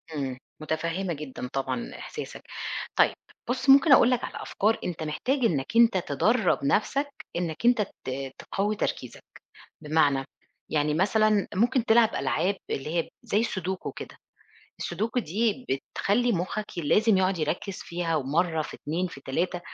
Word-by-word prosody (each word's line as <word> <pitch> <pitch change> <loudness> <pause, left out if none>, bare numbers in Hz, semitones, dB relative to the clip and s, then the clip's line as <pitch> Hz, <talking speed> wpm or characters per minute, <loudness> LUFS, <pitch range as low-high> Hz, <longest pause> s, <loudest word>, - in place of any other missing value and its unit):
إمم، 135 -3 -3 0.2
مُتفهِّمة 165 +4 -2
جدًا 140 -4 -6
طبعًا 135 - -2
إحساسك. - - -7 0.5
طيب، - - +4 0.3
بُص 255 +2 -1
ممكن 280 +3 +7
أقول 255 -2 +7
لك 250 -1 +1
على - - -5
أفكار 220 +3 +1
أنت 170 -3 -3
محتاج 205 - -1
إنّك 140 -10 +1
أنت 230 -4 +6
تدرّب 215 - +2
نَفْسك 275 - 0
إنّك 170 +3 -3
أنت 240 -3 +5 0.2
ت 135 0 -4
تقوّي 205 +2 -2
تركيزك، - - -4 0.6
بمعنى؟ 150 -3 +2 0.4
يعني 150 0 +1
مثلًا 210 +3 +3
ممكن 235 +4 +2
تلعب 225 -1 +4
ألعاب 155 +9 0
اللي 150 +5 -3
هي 165 - -3
زي 205 - +1
السودوكو 190 -4 -2
كده. - - -9 0.6
السودوكو 220 +8 -2
دي 225 +6 -1 0.3
بتخلّي 240 +4 +2
مُخّك 190 +3 -2
لازم 210 +7 +3
يقعُد 185 -1 +1
يركِّز 170 +5 -2
فيها 170 -1 -2
ومّرة، 155 +3 +1
في - - -8
2، 170 +5 -2
في 145 -5 -10
3، 175 +7 -2
185 Hz, 145 wpm, -27 LUFS, 155-220 Hz, 0.6 s, ممكن